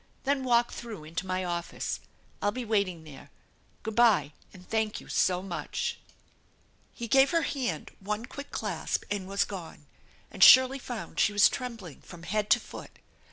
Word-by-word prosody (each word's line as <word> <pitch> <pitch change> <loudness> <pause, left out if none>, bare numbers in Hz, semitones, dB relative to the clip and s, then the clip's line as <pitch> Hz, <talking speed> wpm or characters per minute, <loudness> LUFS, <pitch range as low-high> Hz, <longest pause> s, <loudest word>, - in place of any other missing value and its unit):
Then 275 -1 0
walk 240 -1 +3
through 225 -9 -8
into 165 +5 -5
my 185 0 -1
office. 175 -1 -3 0.4
I'll 205 - +1
be 250 +2 -5
waiting 200 -6 0
there. 150 -4 -13 0.6
G - - -1
ood 220 - -7
by, 200 -12 +4 0.2
and 180 -2 -15
thank 220 -1 -1
you - - -14
so 180 0 +1
much! 170 -6 -4 0.5
" - - -37 0.3
He 235 - -6
gave 270 +4 +5
her 335 -2 +1
hand 260 -4 -3
one 210 +3 -3
quick 280 +3 -9
clasp - - -2
and 200 -2 -2
was 200 +1 +1
gone, 170 -6 -9 0.5
and - - +2
Shirley 260 +1 +8
found 245 -3 -6
she 205 - +3
was 205 0 +7
trembling 230 - -6
from 170 -2 -12
head 210 +3 -1
to - - +5
foot. - - -11
210 Hz, 175 wpm, -29 LUFS, 180-240 Hz, 0.6 s, Shirley